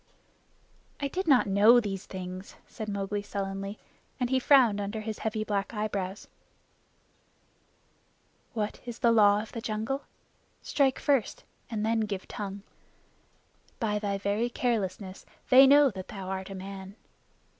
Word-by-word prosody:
"I 285 - -1
did 375 +5 -3
not 270 -5 +5
know 210 +5 +6
these 200 -4 -4
things," 185 0 -7
said 215 -1 -6
Mowgli 200 0 -2
sullenly, 195 0 -4 0.4
and 250 0 -1
he 260 - +3
frowned 245 -7 +5
under 205 +2 -4
his 215 0 -5
heavy 215 -1 -2
black 205 +1 -2
eyebrows. 200 -2 -3 2.3
"What 215 -3 -3
is 240 -2 -7
the 235 -4 +3
Law 210 -2 +5
of 220 - -12
the 230 - -6
Jungle? 225 +6 -3 0.6
Strike 270 -3 +2
first 275 -8 0 0.3
and 215 -2 -2
then 225 0 +1
give 205 -3 -3
tongue. 200 -1 -6 1.2
By 210 -3 0
thy 200 -1 -1
very 205 +4 0
carelessness 200 -6 -2 0.3
they 265 +1 +9
know 285 0 +6
that 190 -2 -8
thou 190 -2 -7
art 190 0 -4
a 195 - -6
man. 190 +1 -8
210 Hz, 140 wpm, -28 LUFS, 195-235 Hz, 2.3 s, they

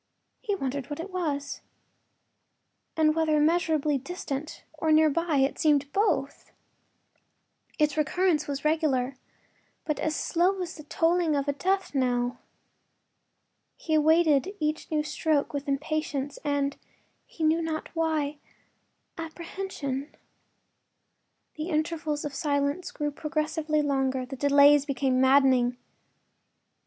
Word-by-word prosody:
He 420 -5 -1
wondered 275 -5 -4
what 290 - -5
it 365 +4 -6
was, 295 -6 -3 1.4
and 310 -1 +4
whether 315 -1 +2
immeasurably 310 -2 +2
distant 295 -1 -6
or 315 0 -1
near 310 0 +5
by— 335 +1 0
it 270 +1 +1
seemed 290 -2 +2
both. 415 +3 0 1.3
Its 300 -1 +2
recurrence 310 +1 +1
was 280 0 -4
regular, 280 -5 +1 0.7
but 300 -2 -2
as 310 +1 -1
slow 365 +3 +1
as 340 - -6
the 305 - -11
tolling 330 0 +1
of 280 0 -1
a 285 - +1
death 380 +5 -1
knell. 245 -2 0 1.4
He 315 - -3
awaited 315 +3 +3
each 305 0 -2
new 305 -1 0
stroke 305 -1 0
with 285 0 -4
impatience 290 -1 -2
and—he 285 +2 -5
knew 315 +2 +3
not 320 -1 -3
why—apprehension. 315 0 -5 1.4
The 310 +3 -4
intervals 310 -2 -1
of 290 - -4
silence 285 +3 -1
grew 295 -1 -3
progressively 305 0 -1
longer; 265 -2 0
the 270 +2 -7
delays 285 +1 +5
became 265 -2 +1
maddening. 260 -2 +4
300 Hz, 115 wpm, -27 LUFS, 280-320 Hz, 1.4 s, near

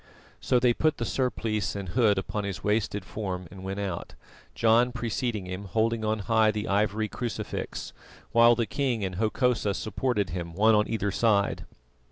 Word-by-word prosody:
So 125 - +2
they 120 -1 +4
put 155 +4 +1
the 115 - -2
surplice 110 -6 -1
and 100 -3 -5
hood 110 0 +3
upon 105 +2 -2
his 100 -2 -5
wasted 105 -2 0
form 90 0 -4
and 95 -1 -10
went 95 +1 -4
out, 95 -4 -4 0.4
John 115 +2 +4
preceding 120 -3 -2
him 90 +2 -6
holding 110 +3 0
on 110 0 +1
high 110 -1 +4
the 105 0 -2
ivory 105 +2 +1
crucifix, 120 +2 -5 0.4
while 120 0 +6
the 115 0 0
king 120 -1 -1
and 90 -1 -4
Hokosa 110 -1 +1
supported 110 -4 -1
him, 85 -1 -5
one 110 +3 +5
on 105 0 +3
either 105 -3 -1
side. 105 -3 +1
110 Hz, 170 wpm, -27 LUFS, 100-115 Hz, 0.4 s, while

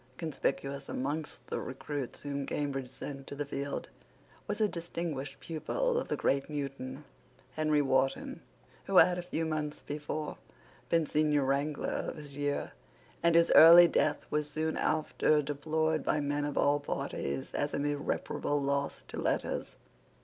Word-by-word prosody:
Conspicuous 140 -3 -2
amongst 150 +4 -3
the - - -3
recruits 135 0 -5
whom 140 -1 -3
Cambridge 135 -3 -2
sent 135 +1 -7
to - - -4
the 145 +1 -3
field 140 0 -4 0.6
was 210 - -2
a 215 - +4
distinguished 165 -6 -4
pupil 480 - -1
of - - -4
the - - -1
great 135 +1 +1
Newton, 135 -1 -5 0.5
Henry 155 -1 +2
Wharton, 135 0 0 0.4
who 195 - +1
had, 180 0 +7
a - - -2
few 170 -2 -2
months 155 -1 -3
before, 150 +1 -4 0.5
been 165 -1 +3
senior 150 -2 +2
wrangler 140 +2 0
of - - -3
his 150 -2 -10
year, 145 0 -2 0.5
and 170 0 +4
whose 170 0 +5
early 170 +2 +10
death 155 -2 +1
was 150 0 0
soon 155 +1 -1
after 155 0 +2
deplored 155 +2 0
by 150 - +1
men 145 0 -1
of 145 - -3
all 145 +1 +3
parties 70 - -3
as 145 0 -1
an 140 - -1
irreparable 145 0 -1
loss 140 0 -1
to - - -5
letters. - - -1
145 Hz, 150 wpm, -31 LUFS, 140-155 Hz, 0.6 s, early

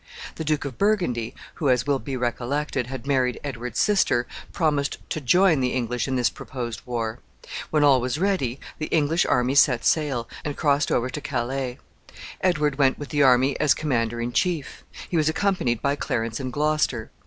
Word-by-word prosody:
The - - -5
Duke 150 -1 0
of 130 -4 -6
Burgundy, 175 - 0 0.3
who, 145 - +2
as 125 -1 +2
will 140 -2 +1
be 135 -2 -4
recollected, 125 +2 -2
had 130 -1 -7
married 130 -3 +1
Edward's 125 -4 -4
sister, 195 - +2 0.3
promised 150 -5 0
to 155 - -2
join 170 +3 +4
the 125 -1 0
English 125 -1 -1
in 135 - -1
this 125 -2 +2
proposed 120 -5 -6
war. 115 -1 -3 0.5
When 150 -1 +2
all 135 -3 +5
was 125 +3 -1
ready, 165 -9 0 0.2
the 155 - -2
English 160 +1 +2
army 125 +1 +2
set 125 -4 +4
sail, 140 -7 +1 0.2
and 145 -1 -4
crossed 145 -1 +2
over 125 +1 +1
to 150 - -5
Calais. 130 -1 -3 0.6
Edward 150 -6 +1
went 135 -1 +3
with 145 - -7
the 145 -2 +1
army 130 0 +4
as 150 -2 +4
commander 120 -6 -1
in 120 +1 -2
chief. 170 -1 -1 0.2
He 175 - -1
was 155 -1 +3
accompanied 160 - 0
by 140 0 +2
Clarence 115 -5 -2
and 130 -2 -4
Gloucester. 150 -5 0
135 Hz, 180 wpm, -24 LUFS, 125-150 Hz, 0.6 s, all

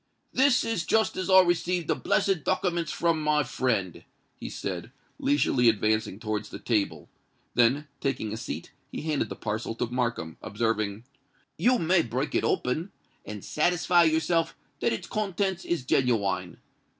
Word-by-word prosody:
"This 260 -1 +4
is 225 -7 -1
just 220 +4 +2
as 185 0 -3
I 190 0 +9
received 175 -1 0
the - - +3
blessed 190 -6 +1
dokiments 175 -2 0
from 165 -2 +1
my 150 -1 +2
friend," 115 - -1 0.3
he - - -7
said, 95 +4 -5 0.3
leisurely 270 - +3
advancing 110 -1 0
towards 110 -2 -3
the - - -7
table: 105 -4 -1 0.5
then, 130 +5 +3
taking 120 -6 -2
a - - -4
seat, 85 - -6 0.2
he - - -5
handed 155 -3 -1
the - - -5
parcel 110 +1 -3
to 120 - -1
Markham, 115 -9 -2
observing, 110 -1 -1 0.5
"You 250 +1 +3
may 175 -1 +3
break 130 +2 -3
it - - +1
open, 155 +10 0 0.4
and 105 -2 -7
satisfy 175 +2 +3
yourself 160 +1 +1 0.2
that - - +1
its - - -3
contents 195 -3 -2
is 170 -7 -1
geniwine. 100 -9 +1
135 Hz, 150 wpm, -27 LUFS, 110-175 Hz, 0.5 s, I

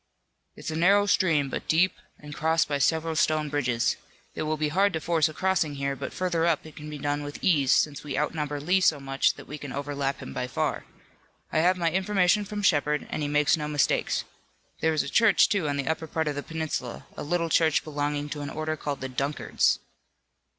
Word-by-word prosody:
"It's - - -6
a - - -4
narrow 200 +5 +4
stream, 165 -8 +2
but - - -5
deep, 175 +4 +3 0.2
and 150 0 -10
crossed 160 +2 +1
by 145 -1 -1
several 160 +4 +1
stone 155 -1 +1
bridges. 125 -4 0 0.4
It - - -5
will 155 0 -1
be 150 0 0
hard 195 +5 +2
to 160 - -1
force 160 0 +2
a - - -9
crossing 185 -6 0
here, 140 0 -2
but - - -6
further 175 -3 -1
up 165 -3 +1
it 155 - -12
can 150 0 -8
be 150 - -6
done 145 +1 -1
with 145 0 -6
ease 145 -7 +3
since 145 -2 +2
we 140 -3 -4
outnumber 150 -1 -1
Lee 180 +6 +2
so 155 -5 +3
much 135 0 +1
that - - -11
we 150 +1 -8
can 140 -2 -7
overlap 140 0 -3
him 130 - -8
by 125 0 -3
far. 125 - -2 0.7
I - - +3
have 180 +3 +3
my 170 -2 +1
information 190 +2 +2
from 205 0 -5
Shepard, 150 -3 +2
and - - -2
he 145 - -1
makes 150 +1 +3
no 150 -2 -4
mistakes. 150 -2 +1 0.6
There 160 - +2
is 155 - +2
a - - -6
church, 225 -5 +4
too, 190 -8 0
on 145 - -1
the 140 -1 -3
upper 160 0 -1
part 160 +1 -2
of 150 - 0
the 145 - -4
peninsula, 160 -6 -4
a - - -6
little 170 +2 -1
church 160 -2 +3
belonging 145 -1 -2
to 145 0 -5
an 145 - -4
order 155 0 -3
called 145 -2 -4
the 130 - -3
Dunkards." 140 +3 0
150 Hz, 220 wpm, -27 LUFS, 145-165 Hz, 0.7 s, narrow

